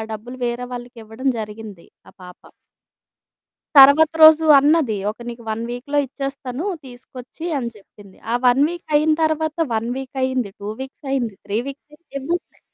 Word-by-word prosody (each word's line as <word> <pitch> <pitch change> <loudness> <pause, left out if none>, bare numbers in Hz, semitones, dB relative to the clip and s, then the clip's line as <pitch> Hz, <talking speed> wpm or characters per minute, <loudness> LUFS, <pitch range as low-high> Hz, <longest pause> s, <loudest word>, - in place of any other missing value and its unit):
డబ్బులు 240 +4 -9
వేరే 240 +1 -3
వాళ్ళకివ్వడం 240 +1 -6
జరిగింది 210 -4 -9 0.2
ఆ - - -16
పాప. 180 0 -13 1.4
తరువాత 280 +3 +8
రోజు 315 0 +8
అన్నది, 290 -6 +2 0.2
"ఒక 220 - -19
నీకు 235 0 -8
1 220 +1 -3
వీక్‌లో 265 +4 -4
ఇచ్చేస్తాను, 275 +1 -6 0.2
తీసుకొచ్చి" 255 +4 -11
అని 240 -3 -3
చెప్పింది. 200 -1 -18
ఆ - - +1
1 250 +3 +4
వీక్ 345 0 -8
అయిన 310 +1 +4
తరువాత, 315 0 0 0.2
1 225 +1 -1
వీక్ 270 0 -8
అయ్యింది, 260 -5 -1
2 205 +1 -6
వీక్స్ 265 +2 -10
అయింది, 240 -6 -1
3 205 +2 -1
వీక్స్ 275 +1 -9
అయింది 300 -2 -19
ఇవ్వట్లేదు. 335 +6 -4
255 Hz, 150 wpm, -20 LUFS, 225-290 Hz, 1.4 s, తరువాత